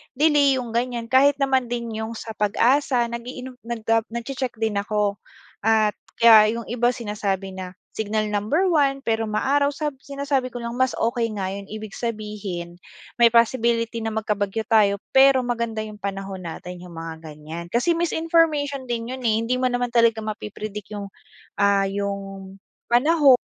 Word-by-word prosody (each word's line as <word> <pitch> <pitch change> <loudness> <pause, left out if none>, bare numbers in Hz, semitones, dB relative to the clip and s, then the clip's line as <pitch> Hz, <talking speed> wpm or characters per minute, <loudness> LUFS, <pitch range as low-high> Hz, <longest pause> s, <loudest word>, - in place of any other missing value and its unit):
delay, 290 -2 +4
yung 245 -3 -4
ganiyan, 235 0 -2
kahit 275 +2 +5
naman 265 -3 +1
din 235 -1 -3
yung 220 +1 -4
sa 220 - -7
PAGASA 240 +4 +2
nag-iinom, 250 +2 -7
nag, 235 -2 -5
ah, 225 -1 +3
nagche-check 250 +2 -4
din 220 -2 -1
ako. 205 -1 -1 0.4
At, 215 -1 +2 0.2
kaya 220 -1 +7
yung 235 - -4
iba 240 0 +1
sinasabi 200 -4 -3
na 185 -1 -8 0.2
signal 215 0 -2
number 290 - +1
1 275 -4 +2
pero 225 0 0
maaraw, 280 +7 +2
sa 295 +1 -2
sinasabi 275 -1 -2
ko 245 -1 -7
lang 235 - -3
mas 260 -1 +2
okey 235 0 0
nga 190 -2 -2
yun, 200 0 -7
ibig 215 -1 -7
sabihin, 210 -7 -5 0.4
may 235 - +8
possibility 230 0 +2
na 225 -1 -3
magkabagyo 210 0 -1
tayo 210 -2 +4 0.2
pero 265 -1 +6
maganda 235 -2 -2
yung 215 -1 -9
panahon 195 -1 -5
natin, 180 +2 -7
yung 175 -2 -11
mga 165 0 -7
ganiyan. 160 +2 -8
Kasi 240 - +1
misinformation 320 -5 +1
din 235 0 -3
yun 260 - -5
eh 215 - +3
hindi 250 +2 0
mo 255 - +2
naman 245 -1 -1
talaga 230 -2 +3
mapi-predict 210 -1 -6
yung, 200 -1 -6 0.5
ah, 200 -1 +4
yung, 195 -1 -4 0.3
panahon 280 +3 +5
230 Hz, 160 wpm, -23 LUFS, 205-255 Hz, 0.5 s, may